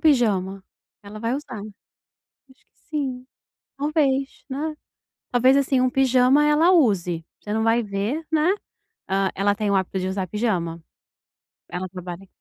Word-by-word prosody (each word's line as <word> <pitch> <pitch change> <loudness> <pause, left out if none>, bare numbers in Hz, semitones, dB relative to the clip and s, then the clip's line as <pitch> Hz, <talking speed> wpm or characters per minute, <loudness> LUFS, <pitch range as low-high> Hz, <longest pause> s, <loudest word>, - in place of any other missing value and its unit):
pijama, 195 - +2 0.4
ela 210 +1 -9
vai 230 +1 -1
usar. 255 -7 -6 0.7
Acho 265 -1 -27
que - - -42
sim. 260 -4 -3 0.5
Talvez, 275 -2 0
né, 305 +3 -3 0.6
talvez 255 +2 +5
assim, 270 -2 +2
um 255 - +3
pijama 260 +2 +4
ela 305 +4 +5
use. 185 - +2 0.2
Você 210 - -4
não 220 0 +1
vai 225 +1 +3
ver, 210 +10 -2
né. 315 +2 +3 0.6
Hã, 195 0 +1
ela 200 +1 +2
tem 210 -1 -1
o - - +2
hábito 190 0 0
de 185 - -2
usar 190 0 -2
pijama? 180 -7 -1 0.9
Ela 180 +1 -4
trabalha 180 +1 -8
230 Hz, 145 wpm, -23 LUFS, 195-275 Hz, 0.9 s, talvez